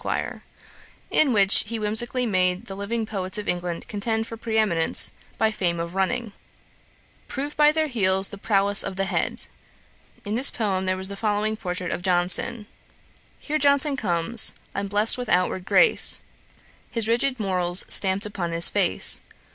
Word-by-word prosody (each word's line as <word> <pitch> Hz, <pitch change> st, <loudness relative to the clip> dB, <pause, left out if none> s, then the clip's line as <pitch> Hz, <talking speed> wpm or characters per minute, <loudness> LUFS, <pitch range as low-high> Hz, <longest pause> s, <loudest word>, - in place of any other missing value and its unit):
,' -, -, -27 dB
in 295 Hz, -4 st, +1 dB
which 200 Hz, -3 st, +4 dB
he 230 Hz, +1 st, -5 dB
whimsically 225 Hz, +4 st, -2 dB
made 185 Hz, -1 st, -2 dB
the 195 Hz, -, -9 dB
living 220 Hz, +3 st, -5 dB
poets 190 Hz, -3 st, -4 dB
of 210 Hz, -, -7 dB
England 175 Hz, -1 st, -5 dB
contend 220 Hz, +2 st, -3 dB
for 230 Hz, -, -10 dB
pre 225 Hz, 0 st, -5 dB
eminence 170 Hz, -7 st, +1 dB, 0.3 s
of 220 Hz, -1 st, 0 dB
fame 175 Hz, -5 st, -3 dB
by 170 Hz, -, -4 dB
running: 195 Hz, +6 st, -4 dB, 0.9 s
'Prove 285 Hz, +2 st, -7 dB
by 300 Hz, 0 st, +3 dB
their 315 Hz, 0 st, -2 dB
heels 195 Hz, -8 st, 0 dB
the 200 Hz, -, -11 dB
prowess 200 Hz, -1 st, 0 dB
of 190 Hz, -, -5 dB
the 195 Hz, 0 st, -3 dB
head.' -, -, -1 dB, 0.8 s
In 205 Hz, -, -5 dB
this 255 Hz, +5 st, +5 dB
poem 190 Hz, -4 st, -4 dB
there 185 Hz, 0 st, -2 dB
was 190 Hz, 0 st, 0 dB
the 200 Hz, -, -8 dB
following 215 Hz, +1 st, -3 dB
portrait 180 Hz, -3 st, -6 dB
of -, -, -5 dB
Johnson: 180 Hz, +4 st, +3 dB, 0.7 s
'Here 310 Hz, +1 st, -4 dB
Johnson 280 Hz, 0 st, +2 dB
comes, 200 Hz, 0 st, +2 dB, 0.2 s
unblest 205 Hz, +4 st, +2 dB
with 245 Hz, -, -7 dB
outward 180 Hz, +1 st, -1 dB
grace, 470 Hz, -, +6 dB, 0.7 s
His 230 Hz, -2 st, -3 dB
rigid 245 Hz, +3 st, -2 dB
morals 180 Hz, -3 st, +1 dB
stamp'd 190 Hz, 0 st, +1 dB
upon 180 Hz, -5 st, -6 dB
his 170 Hz, 0 st, +6 dB
face. -, -, +5 dB
205 Hz, 160 wpm, -22 LUFS, 185-230 Hz, 0.9 s, grace